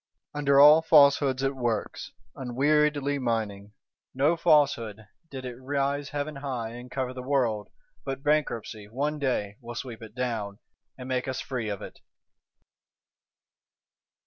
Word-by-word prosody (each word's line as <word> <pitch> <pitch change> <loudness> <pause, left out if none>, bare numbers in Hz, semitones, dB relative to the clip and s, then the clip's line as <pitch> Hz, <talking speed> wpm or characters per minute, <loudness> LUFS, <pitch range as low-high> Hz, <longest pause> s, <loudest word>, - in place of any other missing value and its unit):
Under 140 -1 +3
all 150 +3 +9
Falsehoods 140 -4 +5
it 135 0 0
works, 120 -4 -3 0.2
unweariedly 145 +2 +1
mining. 105 -4 -3 0.4
No 145 +6 +3
Falsehood, 120 -10 +2 0.2
did 130 -2 -7
it 125 -1 -6
rise 140 +1 -1
heaven 145 0 -4
high 130 -5 -4
and 120 +2 -10
cover 130 0 -3
the 130 - -7
world, 125 -6 0 0.3
but 135 +1 -5
Bankruptcy, 120 -8 -1
one 145 +7 -2
day, 105 -7 -1
will 120 0 -8
sweep 115 -2 -6
it 110 -1 -11
down, 110 -5 -3 0.4
and 125 -1 -8
make 130 0 -1
us 130 - -3
free 120 -5 -4
of 100 -2 -5
it. - - -10
130 Hz, 135 wpm, -27 LUFS, 115-145 Hz, 0.4 s, all